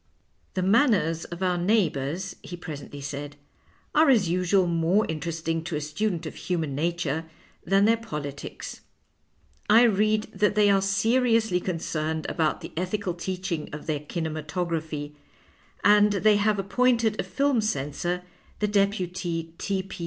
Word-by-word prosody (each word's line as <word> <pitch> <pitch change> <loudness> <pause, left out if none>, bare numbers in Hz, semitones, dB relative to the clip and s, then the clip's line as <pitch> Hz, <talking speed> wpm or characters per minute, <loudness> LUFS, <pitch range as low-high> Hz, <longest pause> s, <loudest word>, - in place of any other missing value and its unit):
" - - -41
The 185 - 0
manners 195 - +3
of 170 +2 -6
our 180 -1 +1
neighbours," 175 -3 0
he 175 - -8
presently 145 -4 -8
said, 145 +1 -6 0.3
" - - -35
are 310 -1 +5
as 225 -9 +4
usual 180 +2 +2
more 170 +5 +2
interesting 165 +1 -3
to 170 - -3
a - - 0
student 165 +4 -2
of 155 - -5
human 165 -6 -2
nature 160 0 -1 0.4
than 195 +2 +3
their 230 +1 +4
polities. 150 -10 -7 0.9
I 225 +3 +7
read 215 -1 +3
that 205 +1 +1
they 205 -1 +5
are 195 -1 +4
seriously 225 0 +2
concerned 160 -3 -2
about 160 -2 0
the - - -8
ethical 185 +2 -2
teaching 180 -2 -4
of 150 - -7
their 155 -2 -1
kinematogra}jiiy, 155 -1 -3 0.7
and 210 0 +6
they 205 +1 +4
have 210 0 +2
appointed 225 +2 +2
a - - +1
fihu 245 +7 +1
censor, 175 0 -2 0.3
the 210 - 0
deputy 185 -5 -1
T. 195 -1 -1
P. 195 - -9
180 Hz, 145 wpm, -26 LUFS, 160-205 Hz, 0.9 s, I